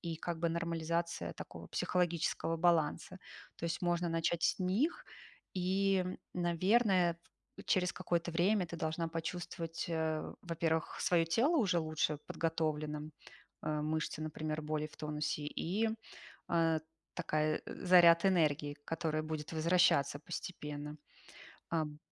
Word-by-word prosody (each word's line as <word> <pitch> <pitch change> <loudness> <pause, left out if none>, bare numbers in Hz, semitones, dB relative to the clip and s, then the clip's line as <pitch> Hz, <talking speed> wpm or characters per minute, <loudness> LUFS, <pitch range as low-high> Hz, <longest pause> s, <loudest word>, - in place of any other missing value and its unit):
и 165 -2 -4
как 170 +1 -4
бы 170 +1 +1
нормализация 170 0 -2
такого - - -9
психологического 170 -2 0
баланса. 170 +1 +1 0.4
То - - -6
есть, 165 +2 -3
можно 175 0 +1
начать 165 0 0
с - - +2
них. 200 - +1 0.5
И, 190 +1 +2 0.3
наверное, 180 0 +3 0.4
т - - -9
через 180 -2 +2
какое-то 170 0 -1
время 180 +4 +2
ты 170 - -7
должна 160 +1 -1
почувствовать, 165 0 -4
э, 160 -2 0 0.2
во-первых, 165 -1 -1
своё 170 -2 +3
тело 255 - +3
уже 180 -7 +3
лучше 155 -1 0
подготовленным, 155 -2 -2 0.5
а, 150 -1 -1
мышцы, 155 0 -2
например, 155 0 -3
более 155 0 -2
в - - -17
тонусе 150 -1 -2
и, 200 +9 -1 0.6
а, 165 -2 +3 0.4
такая, 155 0 0
заряд 175 -1 +6
энергии, 150 -6 +2
которая 160 -1 -1
будет 155 0 -5
возвращаться 160 -3 +3
постепенно. 150 -3 -6 0.7
Ам 155 -3 -1
165 Hz, 120 wpm, -34 LUFS, 155-175 Hz, 0.7 s, заряд